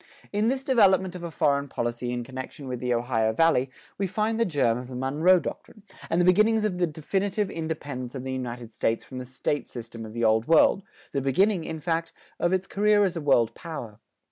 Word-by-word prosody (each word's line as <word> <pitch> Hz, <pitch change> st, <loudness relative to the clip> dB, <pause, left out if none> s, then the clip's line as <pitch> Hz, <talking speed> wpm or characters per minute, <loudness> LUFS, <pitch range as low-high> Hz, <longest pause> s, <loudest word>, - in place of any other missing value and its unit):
In 210 Hz, +2 st, +2 dB
this 265 Hz, +2 st, 0 dB
development 195 Hz, -8 st, +4 dB
of 180 Hz, -, -7 dB
a 170 Hz, -, -5 dB
foreign 140 Hz, -2 st, +1 dB
policy 120 Hz, -1 st, -3 dB
in 120 Hz, 0 st, -3 dB
connection 130 Hz, +2 st, -8 dB
with 125 Hz, -1 st, -4 dB
the 125 Hz, 0 st, -2 dB
Ohio 115 Hz, -2 st, +1 dB
Valley, 135 Hz, -2 st, +3 dB, 0.3 s
we 195 Hz, -, +1 dB
find 220 Hz, +4 st, -1 dB
the 230 Hz, -, +3 dB
germ 135 Hz, -, +1 dB
of 125 Hz, -, -8 dB
the 130 Hz, -, -8 dB
Monroe 150 Hz, +8 st, +3 dB
doctrine, 200 Hz, +6 st, -8 dB, 0.3 s
and 165 Hz, -, +1 dB
the 175 Hz, -, +4 dB
beginnings 215 Hz, +4 st, +4 dB
of 190 Hz, -4 st, -1 dB
the 175 Hz, -, +2 dB
definite 190 Hz, +6 st, -2 dB
independence 155 Hz, -, -3 dB
of 130 Hz, -, -5 dB
the 130 Hz, 0 st, -3 dB
United 120 Hz, -2 st, -5 dB
States 115 Hz, +1 st, -1 dB
from 130 Hz, -, -8 dB
the 125 Hz, -, -6 dB
state 130 Hz, +3 st, -2 dB
system 115 Hz, -1 st, -8 dB
of 110 Hz, -1 st, -9 dB
the 115 Hz, 0 st, -2 dB
Old 110 Hz, +1 st, +3 dB
World, 165 Hz, +4 st, +5 dB, 0.3 s
the 140 Hz, -, -1 dB
beginning, 175 Hz, +7 st, +2 dB
in 160 Hz, -1 st, -5 dB
fact, 165 Hz, +1 st, -2 dB, 0.3 s
of 175 Hz, -, +1 dB
its 190 Hz, 0 st, +1 dB
career 205 Hz, +1 st, +3 dB
as 185 Hz, -3 st, 0 dB
a 165 Hz, -, -3 dB
world 120 Hz, -6 st, +3 dB
power. 120 Hz, -, -8 dB
150 Hz, 215 wpm, -26 LUFS, 125-185 Hz, 0.3 s, World